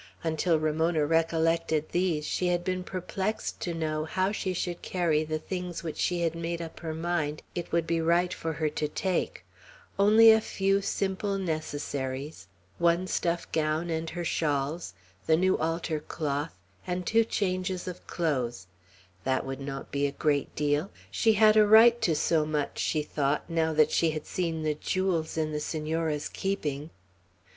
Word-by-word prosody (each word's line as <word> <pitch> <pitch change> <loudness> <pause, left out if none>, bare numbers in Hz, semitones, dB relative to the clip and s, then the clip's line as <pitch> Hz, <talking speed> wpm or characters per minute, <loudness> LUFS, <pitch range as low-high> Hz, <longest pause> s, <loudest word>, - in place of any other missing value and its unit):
Until 160 +1 +1
Ramona 155 0 +1
recollected 165 0 +1
these, 175 -4 0
she 180 - 0
had 175 0 +1
been 185 0 -2
perplexed 190 +3 -3
to 175 - -3
know 155 -2 -2
how 185 +4 0
she 195 -3 -2
should 175 -1 -3
carry 165 -4 +1
the 155 0 -2
things 180 +1 -5
which 160 -2 -5
she 175 -1 0
had 165 -1 +1
made 170 0 -3
up 165 -1 -7
her 160 -2 -4
mind 160 -3 -2
it 175 - -5
would 170 -1 +1
be 165 0 0
right 170 +2 +2
for 160 0 -3
her 155 0 -1
to 150 0 -1
take, 185 +4 -2 0.5
only 220 +3 +8
a 220 0 +5
few; 195 -1 +1
simply 195 0 -1
necessaries; 145 - -4 0.3
one 170 +1 +3
stuff 170 -2 -1
gown 160 +2 0
and 160 0 -2
her 175 +1 -4
shawls; 145 - -1 0.3
the 160 - +5
new 185 +2 +3
altar 165 -1 -1
cloth, 150 0 -3 0.3
and 180 0 -2
two 225 +4 +4
changes 185 -4 -2
of 180 0 -7
clothes; 125 - -1 0.6
that 130 0 0
would 135 0 -5
not 135 0 -6
be 140 0 +1
a - - -4
great 145 -1 0
deal; 150 +4 0 0.2
she 225 -1 +3
had 215 0 +5
a 215 -1 +6
right 230 +2 +7
to 165 - +2
so 155 +1 +2
much, 150 -1 -2
she 155 -2 0
thought, 145 -1 -1
now 165 -1 +1
that 155 -1 +4
she 165 - +3
had 155 -1 -4
seen 165 -3 -2
the 155 -1 +1
jewels 170 0 -1
in 155 -1 0
the 150 - -2
Senora's 155 0 -2
keeping. 155 -7 -3
165 Hz, 170 wpm, -28 LUFS, 155-180 Hz, 0.6 s, only